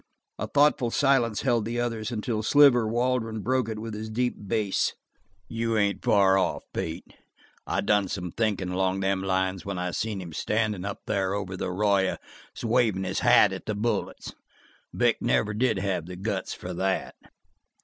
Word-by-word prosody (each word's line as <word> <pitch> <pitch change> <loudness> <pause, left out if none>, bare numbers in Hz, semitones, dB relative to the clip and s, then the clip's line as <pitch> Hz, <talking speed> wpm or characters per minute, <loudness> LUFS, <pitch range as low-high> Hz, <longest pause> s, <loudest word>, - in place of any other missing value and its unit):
A - - -2
thoughtful 145 -4 +3
silence 120 -5 +2
held 120 -5 +2
the 115 +2 -3
others 115 -2 -2
until 110 -1 -2
Sliver 125 -1 +5
Waldron 115 -1 -1
broke 130 0 0
it 110 - -4
with 110 0 -6
his 110 +1 -5
deep 125 +3 0
bass. 105 -2 0 0.5
"You 115 +1 -1
ain't 100 -2 0
far 95 -2 +4
off, - - -1
Pete. 85 +2 -4 0.6
I - - 0
done 105 -2 +2
some 90 -3 -4
thinkin' 105 -4 -1
along 95 +1 0
them 95 0 0
lines 95 -1 -1
when 100 -1 -4
I 90 0 -2
seen 105 +2 -2
him 85 -3 -8
standin' 105 0 -1
up 100 - -5
there 100 -2 0
over 95 -2 -4
the 90 - -3
arroyo 100 0 +1 0.5
wavin' 115 -5 +2
his 95 0 -2
hat - - +5
at - - -8
the 105 - -1
bullets. 115 +3 -2 0.6
Vic - - +1
didn't - - -3
never 105 -1 +1
have 90 -4 -2
the 90 - -7
guts 95 0 -3
for 90 - -7
that." 95 +2 -1
105 Hz, 170 wpm, -26 LUFS, 95-115 Hz, 0.6 s, Sliver